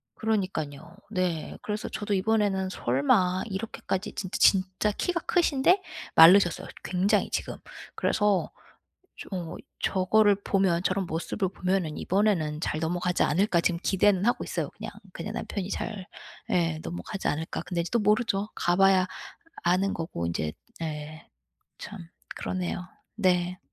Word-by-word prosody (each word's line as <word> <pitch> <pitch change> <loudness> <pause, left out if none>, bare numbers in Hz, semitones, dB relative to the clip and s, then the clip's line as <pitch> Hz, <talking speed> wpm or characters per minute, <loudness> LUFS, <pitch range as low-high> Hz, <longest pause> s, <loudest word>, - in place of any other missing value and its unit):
그러니깐요. 175 -8 -2
네. 180 -6 -2
그래서 210 +1 -4
저도 205 -1 -3
이번에는 200 -1 +1
설마 180 +7 +2
이렇게까지 195 -1 -4
진짜 185 -1 -3
진짜 190 +2 +3
키가 340 - -1
크신데 350 +2 +3 0.3
마르셨어요, 175 +2 +7 0.2
굉장히 185 +2 +1
지금. - - -3 0.4
그래서 205 -3 +1 0.6
좀 - - -11
어 175 -4 -4 0.2
저거를 205 +2 +3
보면 190 -4 +2
저런 190 +1 0
모습을 170 +4 -2
보면은 180 -4 -1
'이번에는 180 -6 +1
잘 155 - -1
넘어가지 175 +2 -1
않을까.' 175 +2 +3
지금 170 0 0
기대는 195 0 +3
하고 240 - +2
있어요 - - -3
그냥. - - -8 0.2
그냥 - - -5
남편이 195 -1 -4
잘 200 -3 -4 0.4
예. 165 -3 +1
'넘어가지 185 +3 -4
않을까.' 160 +2 -2
근데 175 -2 -2
인제 170 - -5
또 235 - +3
모르죠. 210 -1 +1
가 175 - +1
봐야 195 -1 +5 0.6
아는 185 +3 +2
거고 160 - -3
인제 80 -2 -2 0.3
예. 155 0 -6 0.5
참 205 -2 -8 0.3
그러네요. 180 -1 -3 0.3
네. 180 -3 +1
185 Hz, 305 characters per minute, -27 LUFS, 170-205 Hz, 0.6 s, 마르셨어요